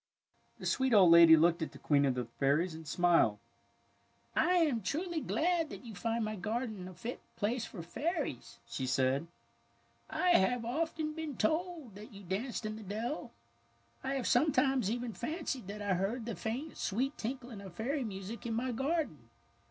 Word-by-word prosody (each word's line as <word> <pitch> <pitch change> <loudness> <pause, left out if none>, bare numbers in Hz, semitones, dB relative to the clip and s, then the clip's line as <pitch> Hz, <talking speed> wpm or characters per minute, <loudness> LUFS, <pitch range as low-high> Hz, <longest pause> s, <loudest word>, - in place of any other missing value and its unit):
The - - -9
sweet 260 -3 +2
old 185 -4 +8
lady 170 -1 +9
looked 170 +2 +3
at 160 - -3
the - - -10
Queen 145 -1 +3
of 130 -2 +1
the 125 -1 -2
Fairies 140 +9 +1
and 160 -1 -9
smiled. 170 -8 +4
^^ - - -25 1.0
I 360 - +3
am 300 -10 +3
truly 320 - -2
glad 330 0 +1
that 260 - -9
you 225 - -8
find 230 +2 -1
my 215 0 -3
garden 215 -1 -3
a 185 - -10
fit 230 +8 -5 0.2
place 230 +3 -1
for 175 -6 -8
fairies," 285 - -3
she 115 +3 -3
said. 130 +4 +1 0.4
" - - -38
1 - - -5
have 240 - +3
often 310 +4 -1
been 310 -5 -5
told 315 - -1
that 210 +2 -11
you 200 0 -11
danced 215 +6 -3
in 215 0 -3
the - - -9
dell. 210 -1 -4 0.7
I 270 +1 -1
have 260 -3 -2
sometimes 270 -4 +3
even 240 0 -2
fancied 275 - -4
that 205 +1 -6
I 200 -2 +1
heard 205 +6 -1
the 230 - -3
faint, 255 +8 -4
sweet 260 +8 -1
tinkling 240 -2 -5
of 190 -3 -10
fairy 265 +7 -1
music 205 +2 -6
in 225 - -1
my 250 +2 -1
garden. 265 - -2
225 Hz, 185 wpm, -33 LUFS, 185-270 Hz, 1.0 s, lady